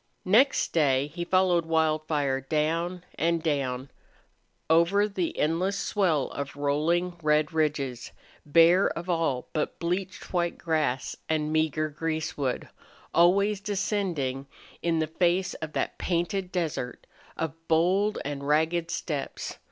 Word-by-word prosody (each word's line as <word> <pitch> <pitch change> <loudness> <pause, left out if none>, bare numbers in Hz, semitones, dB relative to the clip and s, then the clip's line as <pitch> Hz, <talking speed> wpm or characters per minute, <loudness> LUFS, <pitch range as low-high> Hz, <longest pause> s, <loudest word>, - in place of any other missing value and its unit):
Next 240 +9 +3
day 145 -3 +2
he 175 0 -3
followed 180 -1 +3
Wildfire 155 -4 +1
down 165 +5 -1 0.2
and 165 0 +1
down, 135 -4 -1 0.8
over 170 +6 +4
the 190 -5 -3
endless 180 +6 +1
swell 175 -10 +1
of 140 0 -5
rolling 165 +5 0
red 150 0 +2
ridges, 145 -6 -1 0.3
bare 165 +5 +5
of 175 +2 -3
all 160 -7 -1
but 155 - -2
bleached 180 +3 -3
white 175 -1 0
grass 155 -6 -1
and 155 -1 0
meager 155 -1 +1
greasewood, 155 -3 -2 0.5
always 200 +4 +4
descending 185 -10 -2 0.3
in 170 -1 +1
the 160 - +1
face 175 +4 +1
of 155 -1 -5
that - - -2
painted 180 +2 -1
desert 155 -8 -3 0.3
of 160 -3 -2
bold 185 +6 +2
and 140 -1 -4
ragged 160 +3 +1
steppes. 145 -5 -4
165 Hz, 120 wpm, -27 LUFS, 150-180 Hz, 0.8 s, bare